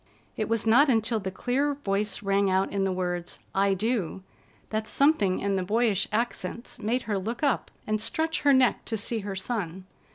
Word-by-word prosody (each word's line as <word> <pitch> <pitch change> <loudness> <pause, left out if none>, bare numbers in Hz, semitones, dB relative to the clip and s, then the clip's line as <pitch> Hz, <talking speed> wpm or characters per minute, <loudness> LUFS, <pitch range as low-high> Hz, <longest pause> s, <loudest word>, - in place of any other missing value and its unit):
It 215 - -2
was 230 -1 0
not 255 +6 +5
until 225 -1 +2
the 190 -2 -4
clear 265 +9 0
voice 210 -6 -2
rang 200 0 +2
out 190 +1 +1
in 195 -1 0
the 190 - 0
words, 175 -1 -2 0.2
"I 195 0 +2
do," 200 -3 -1 0.5
that 215 0 -2
something 250 -11 +3
in 200 -1 0
the 185 - 0
boyish 215 0 +2
accents 230 0 -3
made 240 +4 0
her 205 -3 -1
look 230 +8 -4
up 280 -4 +1 0.2
and 215 0 -1
stretch 320 +9 0
her 285 - +5
neck 260 -2 +3
to 225 - -2
see 225 +2 -1
her 200 -1 -5
son. 190 -3 -4
215 Hz, 190 wpm, -27 LUFS, 195-240 Hz, 0.5 s, not